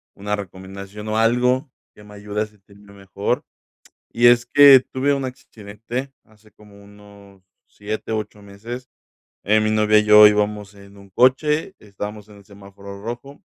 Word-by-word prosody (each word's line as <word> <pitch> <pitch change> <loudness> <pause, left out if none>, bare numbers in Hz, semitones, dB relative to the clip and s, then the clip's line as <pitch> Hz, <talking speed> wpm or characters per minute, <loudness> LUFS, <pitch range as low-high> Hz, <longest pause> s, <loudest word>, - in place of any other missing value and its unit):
una 105 +1 -3
recomendación 100 +2 -10
o 110 - -2
algo 125 +4 +1 0.3
que 105 - -16
me 105 0 -15
ayude 105 +1 -5
a 110 - -1
sentirme 100 -1 -21
mejor. 100 0 -4 0.7
Y 120 +1 +3
es 120 0 +4
que 140 +1 +7
tuve 140 +2 0
un 135 -1 -4
accidente, 120 +2 -8
hace 110 0 -25
como 100 -1 -19
unos 100 -1 -18 0.2
7, 105 +2 -7
8 105 -1 -5
meses. 115 +6 -10 0.5
Eh, 110 +2 +3
mi 110 - 0
novia 110 0 +3
y - - 0
yo 105 0 +8
íbamos 105 -1 -2
en 100 0 -17
un 100 -1 -17
coche, 150 - +1
estábamos 105 +1 -9
en 105 - -15
el 100 - -19
semáforo 100 0 -13
rojo, 120 +6 -9
105 Hz, 160 wpm, -20 LUFS, 100-120 Hz, 0.7 s, yo